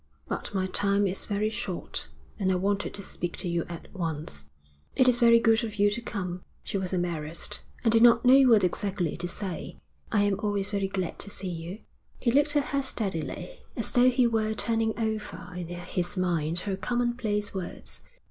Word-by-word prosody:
'But -, -, -4 dB
my 190 Hz, -2 st, 0 dB
time 200 Hz, +1 st, +3 dB
is 190 Hz, 0 st, 0 dB
very 210 Hz, +1 st, 0 dB
short, 195 Hz, -4 st, -4 dB, 0.3 s
and 190 Hz, -2 st, +2 dB
I -, -, +2 dB
wanted 200 Hz, +2 st, 0 dB
to 200 Hz, -, -5 dB
speak 175 Hz, -2 st, -5 dB
to 185 Hz, -, -2 dB
you 170 Hz, -1 st, 0 dB
at 170 Hz, -1 st, -7 dB
once.' 155 Hz, -, -4 dB, 0.5 s
'It 255 Hz, -, +4 dB
is 245 Hz, -1 st, +4 dB
very 235 Hz, -1 st, +7 dB
good 225 Hz, 0 st, +4 dB
of 220 Hz, -2 st, -4 dB
you 205 Hz, 0 st, +3 dB
to 235 Hz, +3 st, -2 dB
come.' 180 Hz, -6 st, -4 dB, 0.2 s
She -, -, -5 dB
was 185 Hz, -1 st, -3 dB
embarrassed, 170 Hz, -3 st, -2 dB, 0.2 s
and 225 Hz, -, +4 dB
did 225 Hz, -, +5 dB
not 235 Hz, 0 st, +6 dB
know 265 Hz, +2 st, +8 dB
what 220 Hz, -4 st, +6 dB
exactly 185 Hz, -1 st, 0 dB
to 175 Hz, +1 st, -2 dB
say. 185 Hz, -1 st, -5 dB, 0.3 s
'I 205 Hz, -2 st, +3 dB
am 205 Hz, -1 st, +1 dB
always 205 Hz, -2 st, -1 dB
very 200 Hz, -2 st, 0 dB
glad 190 Hz, -3 st, -3 dB
to 200 Hz, -, -5 dB
see 195 Hz, -2 st, -6 dB
you.' 170 Hz, +5 st, -6 dB, 0.4 s
He 235 Hz, -, +2 dB
looked 290 Hz, +3 st, +4 dB
at 290 Hz, -, +2 dB
her 280 Hz, -, +3 dB
steadily, 185 Hz, -, -3 dB, 0.2 s
as 230 Hz, -, +1 dB
though 250 Hz, +1 st, +6 dB
he 250 Hz, 0 st, +3 dB
were 220 Hz, -2 st, +1 dB
turning 225 Hz, 0 st, +1 dB
over 220 Hz, -5 st, -3 dB
in 180 Hz, -2 st, -4 dB
his 175 Hz, +1 st, -3 dB
mind 170 Hz, -2 st, 0 dB
her 195 Hz, 0 st, -2 dB
commonplace 235 Hz, 0 st, -1 dB
words. 190 Hz, -3 st, -4 dB
200 Hz, 195 wpm, -28 LUFS, 180-225 Hz, 0.5 s, know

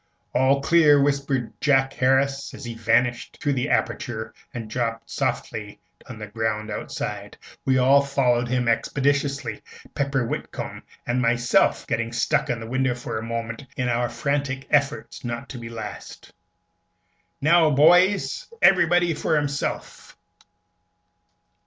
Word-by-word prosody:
"All 135 Hz, +2 st, +3 dB
clear," 150 Hz, -3 st, +5 dB
whispered 140 Hz, -3 st, 0 dB
Jack 135 Hz, -2 st, +3 dB
Harris, 135 Hz, +1 st, +1 dB
as 140 Hz, -, -9 dB
he 120 Hz, -, -5 dB
vanished 115 Hz, +2 st, 0 dB
through 145 Hz, -, 0 dB
the 125 Hz, -2 st, -1 dB
aperture 110 Hz, -2 st, -2 dB, 0.2 s
and 115 Hz, -3 st, -6 dB
dropped 115 Hz, 0 st, -3 dB
softly 105 Hz, -2 st, -3 dB, 0.3 s
on 120 Hz, -, -8 dB
the 105 Hz, -, -6 dB
ground 110 Hz, 0 st, -3 dB
outside. -, -, -5 dB, 0.3 s
We 130 Hz, -1 st, +3 dB
all 135 Hz, +2 st, +5 dB
followed 125 Hz, -4 st, +1 dB
him 125 Hz, 0 st, 0 dB
expeditiously 140 Hz, +3 st, 0 dB, 0.3 s
Pepper 135 Hz, -3 st, 0 dB
Whitcomb -, -, -5 dB, 0.2 s
and 120 Hz, +1 st, 0 dB
myself 120 Hz, 0 st, +2 dB
getting 115 Hz, 0 st, -2 dB
stuck 120 Hz, -, +1 dB
in 125 Hz, -2 st, -1 dB
the 115 Hz, -, -7 dB
window 130 Hz, 0 st, 0 dB
for 120 Hz, -2 st, -5 dB
a -, -, -7 dB
moment 115 Hz, +2 st, -4 dB
in 125 Hz, -1 st, 0 dB
our 120 Hz, 0 st, 0 dB
frantic 140 Hz, -2 st, -2 dB
efforts 145 Hz, +1 st, 0 dB
not 120 Hz, -1 st, -5 dB
to 125 Hz, -, -7 dB
be 115 Hz, -1 st, -8 dB
last. 115 Hz, -1 st, -9 dB, 1.1 s
"Now, 160 Hz, +2 st, +4 dB
boys, 175 Hz, +7 st, +4 dB, 0.2 s
everybody 175 Hz, -2 st, +4 dB
for 155 Hz, +1 st, 0 dB
himself!" 145 Hz, -1 st, -3 dB
130 Hz, 135 wpm, -24 LUFS, 115-140 Hz, 1.1 s, clear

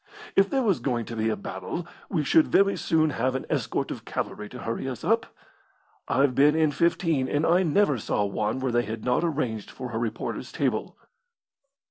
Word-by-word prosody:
"If 195 Hz, 0 st, +5 dB
there 270 Hz, -1 st, +1 dB
was 200 Hz, -6 st, +2 dB
going 120 Hz, -4 st, -1 dB
to 115 Hz, -, -7 dB
be 110 Hz, 0 st, 0 dB
a 110 Hz, -, 0 dB
battle 95 Hz, -, -5 dB, 0.2 s
we 165 Hz, -6 st, 0 dB
should 315 Hz, -, +4 dB
very 200 Hz, 0 st, +4 dB
soon 155 Hz, -1 st, +2 dB
have 130 Hz, 0 st, 0 dB
an 130 Hz, -, -3 dB
escort -, -, -1 dB
of -, -, -6 dB
cavalry 105 Hz, 0 st, -4 dB
to 125 Hz, -, -9 dB
hurry 115 Hz, +4 st, -3 dB
us 125 Hz, -, -7 dB
up. 225 Hz, +1 st, +2 dB, 0.8 s
I've 135 Hz, -1 st, +3 dB
been 145 Hz, +4 st, +5 dB
in 160 Hz, -2 st, +3 dB
fifteen, 165 Hz, -3 st, +1 dB
and 145 Hz, +4 st, +1 dB
I 175 Hz, +2 st, +4 dB
never 165 Hz, -, +2 dB
saw 105 Hz, -, 0 dB
one 105 Hz, +5 st, -1 dB
where 130 Hz, -1 st, -1 dB
they 120 Hz, 0 st, +3 dB
had 110 Hz, -1 st, -6 dB
not 125 Hz, +6 st, +2 dB
arranged 130 Hz, -, -2 dB
for 125 Hz, -1 st, -7 dB
a 115 Hz, -, -2 dB
reporter's 115 Hz, -2 st, -4 dB
table." -, -, -1 dB
135 Hz, 195 wpm, -26 LUFS, 115-165 Hz, 0.8 s, If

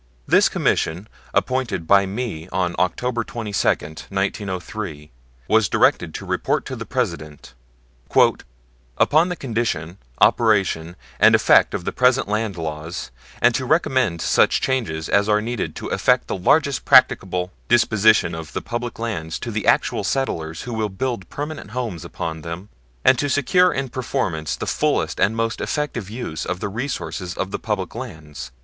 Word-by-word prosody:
This -, -, +5 dB
Commission, 90 Hz, +6 st, 0 dB, 0.2 s
appointed 130 Hz, -9 st, -1 dB
by 100 Hz, +3 st, +4 dB
me 95 Hz, -6 st, -4 dB
on 90 Hz, -1 st, 0 dB
October 115 Hz, +7 st, 0 dB
22, 110 Hz, -5 st, -3 dB, 0.4 s
1903, 95 Hz, -4 st, -4 dB, 0.4 s
was 110 Hz, -3 st, +3 dB
directed -, -, +2 dB
to -, -, -6 dB
report -, -, -1 dB
to -, -, -5 dB
the -, -, -7 dB
President: 75 Hz, -4 st, -4 dB, 1.4 s
"Upon 160 Hz, +4 st, +4 dB
the 180 Hz, -, -2 dB
condition, 110 Hz, -, -3 dB, 0.2 s
operation, 95 Hz, -7 st, +2 dB, 0.2 s
and -, -, +7 dB
effect -, -, +4 dB
of 85 Hz, -, -5 dB
the -, -, -1 dB
present 125 Hz, -2 st, +3 dB
land 105 Hz, -2 st, -1 dB
laws, 80 Hz, -2 st, -5 dB, 0.3 s
and 120 Hz, 0 st, +6 dB
to 130 Hz, -, -1 dB
recommend 130 Hz, -, +1 dB
such -, -, +3 dB
changes 100 Hz, -13 st, -1 dB
as 100 Hz, +1 st, +2 dB
are 105 Hz, 0 st, +4 dB
needed 115 Hz, +1 st, -3 dB
to -, -, -6 dB
effect -, -, +2 dB
the -, -, -2 dB
largest 140 Hz, -, +2 dB
practicable 95 Hz, -7 st, +4 dB, 0.2 s
disposition 110 Hz, -6 st, +4 dB
of 80 Hz, -1 st, -7 dB
the -, -, -2 dB
public 120 Hz, 0 st, -4 dB
lands 85 Hz, -9 st, -3 dB
to 110 Hz, -3 st, -4 dB
actual -, -, +2 dB
settlers 80 Hz, -12 st, -2 dB
who 120 Hz, -, -6 dB
will 110 Hz, -2 st, -1 dB
build 100 Hz, 0 st, -3 dB
permanent 145 Hz, -5 st, -6 dB
homes 110 Hz, -8 st, -4 dB
upon 80 Hz, -1 st, -5 dB
them, 85 Hz, +6 st, -7 dB, 0.4 s
and 130 Hz, -, +5 dB
to 145 Hz, -, 0 dB
secure 180 Hz, +7 st, +3 dB
in 135 Hz, 0 st, -2 dB
permanence 120 Hz, -, -2 dB
the -, -, -5 dB
fullest -, -, 0 dB
and 105 Hz, +3 st, +2 dB
most 115 Hz, -1 st, -1 dB
effective 120 Hz, -2 st, -3 dB
use 110 Hz, -9 st, -5 dB
of 90 Hz, -, -3 dB
the 100 Hz, -, -3 dB
resources 105 Hz, -6 st, -4 dB
of 95 Hz, -, -3 dB
the -, -, -3 dB
public 105 Hz, -5 st, -3 dB
lands." 80 Hz, -, -8 dB
105 Hz, 155 wpm, -21 LUFS, 85-120 Hz, 1.4 s, and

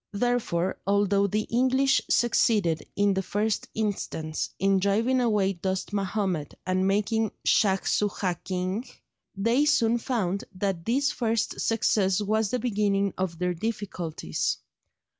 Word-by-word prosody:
Therefore, 205 Hz, -6 st, 0 dB
although 200 Hz, 0 st, +3 dB
the 215 Hz, +2 st, 0 dB
English 260 Hz, +3 st, +3 dB
succeeded, 210 Hz, -8 st, +2 dB
in 205 Hz, 0 st, +3 dB
the 190 Hz, -, 0 dB
first 210 Hz, +3 st, -1 dB
instance, 190 Hz, -7 st, -2 dB
in 195 Hz, 0 st, +2 dB
driving 225 Hz, +7 st, +2 dB
away 210 Hz, -5 st, +2 dB
Dost 190 Hz, +3 st, -3 dB
Mahomed 190 Hz, -6 st, -2 dB
and 185 Hz, +1 st, +1 dB
making 215 Hz, +2 st, +1 dB, 0.2 s
Shaj 195 Hz, -2 st, +3 dB
Soojah 190 Hz, -4 st, -1 dB
king, 185 Hz, +4 st, -2 dB, 0.5 s
they 230 Hz, +8 st, +2 dB
soon 240 Hz, -6 st, +3 dB
found 205 Hz, -6 st, -2 dB
that 185 Hz, -3 st, -2 dB
this 275 Hz, +5 st, +1 dB
first 230 Hz, -5 st, -1 dB
success 205 Hz, -4 st, +2 dB
was 215 Hz, 0 st, 0 dB
the 250 Hz, -, 0 dB
beginning 200 Hz, -4 st, 0 dB
of 185 Hz, -3 st, -3 dB
their 180 Hz, +1 st, 0 dB
difficulties. 175 Hz, -, -3 dB
200 Hz, 125 wpm, -26 LUFS, 190-225 Hz, 0.5 s, although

